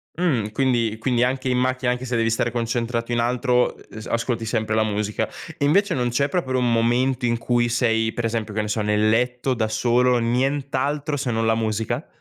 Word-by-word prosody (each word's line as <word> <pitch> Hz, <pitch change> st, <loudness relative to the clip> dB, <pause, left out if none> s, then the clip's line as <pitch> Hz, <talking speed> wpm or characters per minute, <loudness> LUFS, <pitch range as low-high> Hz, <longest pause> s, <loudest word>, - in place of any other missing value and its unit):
Mh, 135 Hz, -12 st, 0 dB
quindi 115 Hz, -4 st, +1 dB
quindi 120 Hz, 0 st, +1 dB
anche 130 Hz, +1 st, -1 dB
in 125 Hz, -, +1 dB
macchina, 130 Hz, 0 st, 0 dB
anche 125 Hz, +1 st, -2 dB
se 120 Hz, -1 st, -2 dB
devi 115 Hz, 0 st, +2 dB
stare 115 Hz, +1 st, 0 dB
concentrato 115 Hz, 0 st, -2 dB
in 120 Hz, -, +1 dB
altro, 125 Hz, +1 st, +1 dB
e -, -, -17 dB
ehm, 110 Hz, -, -8 dB
ascolti 115 Hz, 0 st, -1 dB
sempre 110 Hz, -1 st, -1 dB
la 110 Hz, -, +3 dB
musica. 105 Hz, 0 st, -1 dB, 0.3 s
Invece 180 Hz, +9 st, +3 dB
non 125 Hz, -2 st, 0 dB
c'è 140 Hz, +4 st, +1 dB
proprio 130 Hz, -9 st, -1 dB
un 125 Hz, -1 st, +1 dB
momento 120 Hz, +3 st, +1 dB
in 115 Hz, -1 st, +1 dB
cui 120 Hz, +1 st, +1 dB
sei 115 Hz, -2 st, +1 dB
per 120 Hz, -, -2 dB
esempio, 115 Hz, -2 st, -2 dB
che 110 Hz, -, -1 dB
ne 105 Hz, -, -2 dB
so, 110 Hz, +1 st, -1 dB
nel 105 Hz, +1 st, +2 dB
letto 125 Hz, +3 st, +1 dB
da 110 Hz, -2 st, -1 dB
solo, 120 Hz, +3 st, +2 dB
nient'altro 140 Hz, +4 st, -1 dB
se 135 Hz, -3 st, -2 dB
non 115 Hz, 0 st, 0 dB
la 110 Hz, -, +3 dB
musica? 110 Hz, -1 st, -2 dB
120 Hz, 205 wpm, -22 LUFS, 115-130 Hz, 0.3 s, la